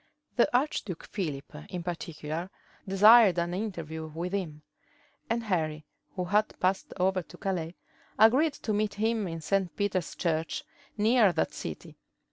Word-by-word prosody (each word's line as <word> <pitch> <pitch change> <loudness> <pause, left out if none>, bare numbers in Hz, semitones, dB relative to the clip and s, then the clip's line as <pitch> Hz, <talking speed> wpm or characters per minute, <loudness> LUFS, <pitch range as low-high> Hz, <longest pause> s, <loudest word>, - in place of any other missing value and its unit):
The 240 - +4
archduke 230 - -2
Philip, 150 -9 -4 0.2
in 175 -1 -5
particular, 165 0 -4 0.4
desired 205 0 +7
an 170 0 0
interview 165 -6 -4
with 170 +4 -5
him; 155 -6 -3 0.7
and 230 +1 0
Henry, 155 -7 -1 0.3
who 180 -2 -2
had 210 +4 +1
passed 190 +1 0
over 185 0 +2
to - - -14
Calais, 175 -3 -3 0.4
agreed 260 +9 +5
to 220 - -3
meet 210 0 0
him 220 -1 0
in 165 -1 -5
St. 190 +1 0
Peter's 195 -4 -1
church, 165 - -1 0.3
near 220 -1 +5
that 160 - 0
city. - - -7
185 Hz, 140 wpm, -29 LUFS, 165-210 Hz, 0.7 s, desired